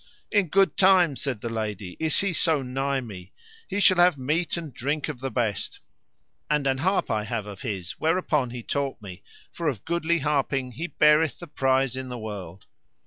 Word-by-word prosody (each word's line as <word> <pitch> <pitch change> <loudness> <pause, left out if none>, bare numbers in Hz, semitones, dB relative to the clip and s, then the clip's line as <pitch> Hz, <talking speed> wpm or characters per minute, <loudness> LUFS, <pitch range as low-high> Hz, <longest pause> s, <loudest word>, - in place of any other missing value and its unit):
In 205 -4 +3
good 195 +4 +3
time, 185 -6 +5
said 130 -5 -3
the 115 - -3
lady, 105 -5 -4
is 160 -1 +1
he 195 -2 0
so 160 -4 +2
nigh 135 +1 -1
me; 95 -6 -10 0.3
he 200 - -2
shall 185 -2 +5
have 175 -3 +5
meat 155 +7 -1
and 160 -5 -6
drink 145 +5 -2
of 140 -5 -5
the 135 +1 -3
best; 115 -6 -2 0.7
and 150 -2 +1
an 135 -1 +1
harp 190 +7 +1
I 110 -1 0
have 110 -1 -3
of 100 -2 -9
his 95 -8 -4
whereupon 155 -5 +1
he 120 -1 -7
taught 140 0 -2
me, 95 -3 -10 0.3
for 170 - -3
of 125 -9 -2
goodly 170 0 +1
harping 140 -4 0
he 160 +9 -4
beareth 150 -1 +4
the 175 - -9
prize 135 -4 +1
in 130 0 -5
the 125 - -5
world. 100 -5 -7
135 Hz, 195 wpm, -26 LUFS, 115-160 Hz, 0.7 s, time